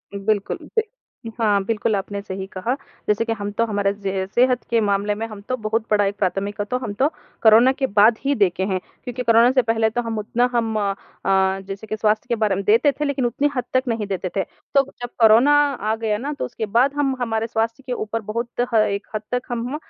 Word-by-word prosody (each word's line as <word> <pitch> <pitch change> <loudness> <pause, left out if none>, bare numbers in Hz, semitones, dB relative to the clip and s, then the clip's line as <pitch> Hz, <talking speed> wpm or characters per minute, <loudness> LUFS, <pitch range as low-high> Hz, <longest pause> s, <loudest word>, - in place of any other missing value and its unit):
बिल्कुल 200 0 -1
जी। 450 - -1 0.6
हाँ, 205 -3 +2
बिल्कुल 220 0 0
आपने 200 +1 -4
सही 190 -1 -6
कहा 210 +7 -1 0.3
जैसे 210 +2 +1
कि 230 - 0
हम 205 -2 -5
तो 230 - +3
हमारे 205 -2 0
ज 190 -1 -1
सेहत 250 0 +3
के 235 - +3
मामले 205 0 +1
में 220 +2 -3
हम 215 -2 -10
तो 255 - +1
बहुत 220 0 -1
बड़ा 205 -1 +4
एक 200 +1 -1
प्राथमिकता 200 +2 -1
तो 230 +5 -2
हम 250 -5 -5
तो 265 +7 +2 0.4
कोरोना 225 +4 +7
के 270 -1 -1
बाद 215 +3 +5
ही 280 0 +2
देखे 190 -4 +1
हैं 185 - 0 0.2
क्योंकि 250 -1 -4
कोरोना 230 +1 +5
से 260 -1 +4
पहले 225 -1 +1
तो 240 +2 -1
हम 230 -2 -4
उतना 240 +4 0
हम 225 -2 0
अ, 200 -1 0 0.7
जैसे 200 +2 -7
कि 215 - -2
स्वास्थ्य 215 +1 +1
के 235 - +2
बारे 215 -3 +1
में 200 - -3
देते 230 +8 +4
थे 295 +2 -3
लेकिन 275 -3 0
उतनी 280 +5 +1
हद 250 - 0
तक 255 - +3
नहीं 225 -3 -1
देते 190 -2 -3
थे। 195 - +1 0.3
तो 275 - +6 0.2
जब 245 - -4
कोरोना 230 +5 +6 0.4
आ - - +1
गया 220 -2 -1
ना 280 +7 -4
तो - - -1
उसके 235 -2 -4
बाद 240 +7 +2
हम 275 -2 +1
हमारे 225 -1 -1
स्वास्थ्य 230 +3 -2
के - - 0
ऊपर 225 -1 -3
बहुत 230 +3 -3 0.3
ह 215 -1 +5
एक 200 0 -4
हद 215 - -1
तक 250 0 0
हम 240 +3 -3
225 Hz, 230 wpm, -22 LUFS, 205-245 Hz, 0.7 s, कोरोना